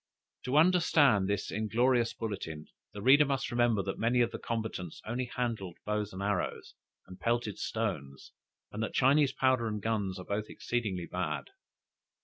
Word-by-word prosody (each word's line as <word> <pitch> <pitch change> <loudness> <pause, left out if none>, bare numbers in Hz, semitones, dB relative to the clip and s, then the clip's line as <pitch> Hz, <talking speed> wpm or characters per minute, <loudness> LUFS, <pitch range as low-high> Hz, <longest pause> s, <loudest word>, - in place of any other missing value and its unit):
To 130 +3 +1
understand 155 - +4
this 100 - -1
inglorious 115 +3 +2
bulletin, 95 -9 -5 0.3
the 100 - -8
reader 140 +4 +7
must 135 -2 -1
remember 120 -4 +2
that 95 - -4
many 120 +2 +2
of 120 0 +2
the - - -6
combatants 110 -7 -4
only 120 +3 -2
handled 115 -8 -3
bows 105 0 -1
and 95 +1 -5
arrows, 100 -3 -2 0.3
and 90 0 -12
pelted 115 0 -1
stones, 75 -12 -4 0.4
and 105 - -5
that 110 - -3
Chinese 140 +2 +4
powder 130 -3 +2
and 105 -1 -2
guns 100 -3 -1
are 90 - -8
both 105 +1 -3
exceedingly 105 -8 -2
bad. 75 -6 -3
110 Hz, 155 wpm, -31 LUFS, 100-120 Hz, 0.4 s, reader